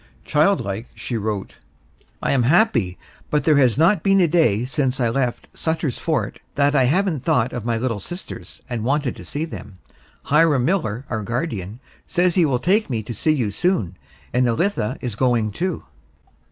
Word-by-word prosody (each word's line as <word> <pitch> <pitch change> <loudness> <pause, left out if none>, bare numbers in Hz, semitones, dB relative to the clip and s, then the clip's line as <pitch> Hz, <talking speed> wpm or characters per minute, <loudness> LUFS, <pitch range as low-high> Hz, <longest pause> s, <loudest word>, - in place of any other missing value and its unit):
Childlike, 140 - +1
she 120 - -4
wrote: 105 -3 -3 0.7
I - - +1
am 135 - +3
happy, 120 - +2 0.3
but 150 - +1
there 155 -3 +4
has 130 -4 +4
not 165 +4 +4
been 195 +2 +3
a 175 - +4
day 135 - +2
since 135 -1 -1
I 120 -2 +2
left 125 0 -1
Sutter's 160 -5 -2
Fort 140 -11 -2 0.2
that 145 +1 +2
I 130 -3 +4
haven't 175 +3 +1
thought 120 0 +1
of 120 -3 -5
my 115 -1 0
little 115 -2 -2
sisters 175 - -9
and 120 -4 -3
wanted 140 +1 0
to - - -10
see 150 +3 -3
them. 105 - -9 0.5
Hiram 150 -4 +3
Miller, 135 - -1
our 110 -2 -1
guardian, 110 - -4 0.3
says 180 -1 +2
he 175 -2 +4
will 130 -3 +1
take 195 - +1
me 115 -4 -2
to 120 - -6
see 155 +8 +1
you 120 -8 -1
soon, 130 - 0 0.4
and 125 +1 +3
Elitha 115 - 0
is 120 -5 -4
going 115 -3 +1
too. 175 - -3
130 Hz, 180 wpm, -21 LUFS, 115-160 Hz, 0.7 s, there